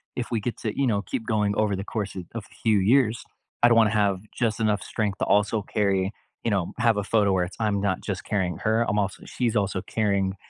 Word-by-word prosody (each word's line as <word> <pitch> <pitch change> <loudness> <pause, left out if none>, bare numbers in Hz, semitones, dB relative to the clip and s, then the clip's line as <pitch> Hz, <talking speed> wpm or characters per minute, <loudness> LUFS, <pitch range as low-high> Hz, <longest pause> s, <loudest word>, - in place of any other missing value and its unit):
if 120 -1 -4
we 115 - +1
get 115 +3 -3
to, 110 - -2
you 135 - +3
know, 100 -3 +1
keep 110 +4 -5
going 105 -2 +1
over 105 -2 +2
the 95 - -4
course 105 -1 -4
of 95 - -5
of 115 -3 -5
a - - -20
few 110 -3 +4
years, 115 +3 +3 0.4
I - - +9
don't 120 - +5
wanna 110 -2 +5
have 100 -3 +1
just 115 -3 -1
enough 105 -3 +1
strength 105 -3 -2
to - - +1
also 105 +1 +2
carry 100 -2 0 0.3
you 115 - +1
know, 95 -4 -1
have 115 -2 +3
a 105 - 0
photo 105 -2 +2
where 90 -1 +2
it's 90 - -7
I'm 105 -2 +1
not 100 -2 0
just 95 -3 -4
carrying 95 -6 -1
her, 110 +2 +1
I'm 105 - 0
also 100 -1 -2
she's 120 -3 -1
also 100 -2 0
carrying 100 -3 0
105 Hz, 245 wpm, -25 LUFS, 100-110 Hz, 0.4 s, I